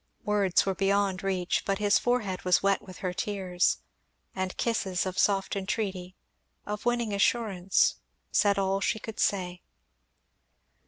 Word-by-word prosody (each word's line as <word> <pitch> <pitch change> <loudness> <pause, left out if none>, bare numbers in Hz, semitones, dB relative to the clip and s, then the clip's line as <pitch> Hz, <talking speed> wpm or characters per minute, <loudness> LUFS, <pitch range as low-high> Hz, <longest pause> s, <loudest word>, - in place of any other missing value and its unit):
Words 205 -3 +2
were 195 - 0
beyond 195 0 +1
reach, 185 -2 -1
but 195 0 0
his 205 -1 +3
forehead 225 -7 -1
was 180 +1 +3
wet 200 -1 +2
with 185 -2 -12
her 180 - -1
tears; 185 -2 0 0.6
and 185 -1 -3
kisses, 195 -6 0
of 185 0 -3
soft 195 -1 +2
entreaty, 190 -2 -3 0.5
of 210 +3 -4
winning 240 -3 0
assurance, 200 -3 +2 0.3
said 200 -2 +3
all 195 0 0
she 220 - +1
could 220 0 -8
say. 180 -3 0
195 Hz, 140 wpm, -28 LUFS, 185-205 Hz, 0.6 s, his